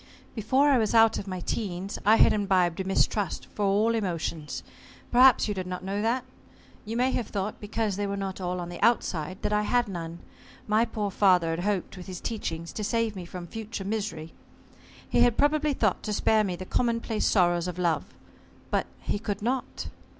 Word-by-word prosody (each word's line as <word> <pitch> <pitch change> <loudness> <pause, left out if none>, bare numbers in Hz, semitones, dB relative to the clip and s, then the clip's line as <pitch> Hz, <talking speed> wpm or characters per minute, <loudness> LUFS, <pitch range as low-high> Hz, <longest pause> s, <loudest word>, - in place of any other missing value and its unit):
"Before 260 +6 +2
I 265 - +4
was 220 +1 0
out 225 0 +5
of 200 - -7
my 185 -2 -4
teens, 190 -1 -3
I 220 - +8
had - - +5
imbibed 190 -4 +1
a - - 0
mistrust 195 +1 0
for 205 - -1
all 210 +4 +3
emotions. 170 -7 -3 0.5
Perhaps 255 0 +6
you 210 - -1
did 185 -2 -4
not 180 0 -5
know 195 +2 -2
that? 240 +3 0 0.6
You 225 +2 -3
may 255 +2 +2
have 235 -4 -2
thought, 200 +1 -4
because 210 -1 -2
they 205 0 -1
were 200 0 -3
not 195 -1 -4
all 180 0 -2
on 175 -1 -5
the 175 - -8
outside, 185 -6 +1
that 210 - 0
I 210 - +3
had 240 +3 +1
none. 170 -3 -5 0.5
My 215 +2 +3
poor 210 -3 -3
father 180 -4 +4
had 165 - -2
hoped, 195 0 -2
with 180 - -9
his 185 -2 -6
teachings, 170 -7 -4
to 215 - -4
save 225 0 0
me 185 -2 -6
from 175 0 -7
future 220 +1 -6
misery. 200 -7 -3 0.7
He - - +1
had 240 -2 +4
probably 300 +1 +2
thought 215 -7 +1
to 210 - -3
spare 215 +1 +3
me 185 -3 -2
the 185 - -7
commonplace 230 0 0
sorrows 175 -3 +3
of 180 -1 -5
love. 170 -3 +1 0.7
But - - +1
he - - -2
could 205 -2 -4
not." 255 +3 -2
205 Hz, 200 wpm, -27 LUFS, 180-225 Hz, 0.7 s, I